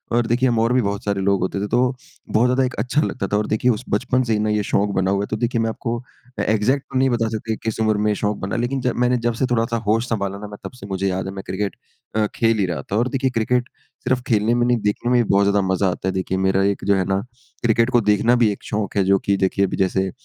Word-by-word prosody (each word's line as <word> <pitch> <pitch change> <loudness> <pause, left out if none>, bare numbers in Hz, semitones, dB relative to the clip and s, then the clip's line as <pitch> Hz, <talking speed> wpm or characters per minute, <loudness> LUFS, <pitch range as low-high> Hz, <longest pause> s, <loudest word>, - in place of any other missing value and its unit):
और 120 -1 +2
देखिए, 125 +2 +2
हम 115 -2 +1
और 115 +2 +2
भी 125 - +3
बहुत 100 -1 -2
सारे 100 -1 0
लोग 100 0 +2
होते 95 +1 -1
थे, 105 - -2
तो 125 +3 +1 0.3
बहुत 115 +3 +3
ज़्यादा 125 +1 +2
एक 130 - -1
अच्छा 130 +4 +1
लगता 100 -10 -2
था - - +4
और 105 - -1
देखिए, 120 +3 +2
उस 115 +3 -3
बचपन 130 0 +1
से 115 -2 0
ही 105 - +1
ना 105 0 0
ये 105 -1 +1
शौक 100 +1 +2
बना 95 0 +1
हुआ 100 0 +1
है। - - -4
तो 110 - 0
देखिए, 120 0 0
मैं 115 - 0
आपको 115 +1 -3
अ, 125 0 -11
एग्ज़ैक्ट 115 +6 +1
तो - - +1
नहीं 135 0 +3
बता 115 -2 0
सकता 110 0 -3
कि - - -5
किस 110 -1 -3
उम्र 110 -1 +2
में 105 +1 +1
ये - - 0
शौक 105 0 -1
बना, 95 - -4
लेकिन 125 +3 -1
जब 125 -1 0
मैंने 125 0 +2
जब 120 - +1
से - - +4
थोड़ा-सा 115 0 +1
होश 115 +3 +2
सँभाला 100 -3 -2
ना, 105 - -7
मैं 105 0 -10
तब - - -6
से - - -7
मुझे 95 0 -1
याद 95 +1 -2
है, - - -4
मैं 95 0 -7
क्रिकेट 100 +1 -2 0.4
अ, 110 - +3
खेल 115 -1 +2
ही 95 - +2
रहा 85 -3 -3
था - - 0
और 120 +3 +2
देखिए, 135 -1 0
क्रिकेट 125 +1 0 0.4
सिर्फ़ 130 -1 +2
खेलने 110 +1 +2
में 120 0 +2
नहीं, 125 -1 +3
देखने 105 +4 -1
में 120 -1 +5
भी - - -8
बहुत 100 0 +4
ज़्यादा 100 0 +3
मज़ा 95 0 +1
आता 90 +2 -5
है। 95 - 0
देखिए, 95 0 -2
मेरा 95 +1 +2
एक - - -14
जो 100 - +3
है 95 -2 0
ना, 95 0 0 0.4
क्रिकेट 115 +1 +3
को 120 -2 +3
देखना 115 +4 +3
भी 105 - +4
एक 100 - -8
शौक 105 -1 -3
है, 100 - +4
जो 95 +1 +3
कि 100 -1 +3
देखिए, 100 +1 +1
अभी - - -3
जैसे, 95 0 0
110 Hz, 300 wpm, -21 LUFS, 100-120 Hz, 0.4 s, में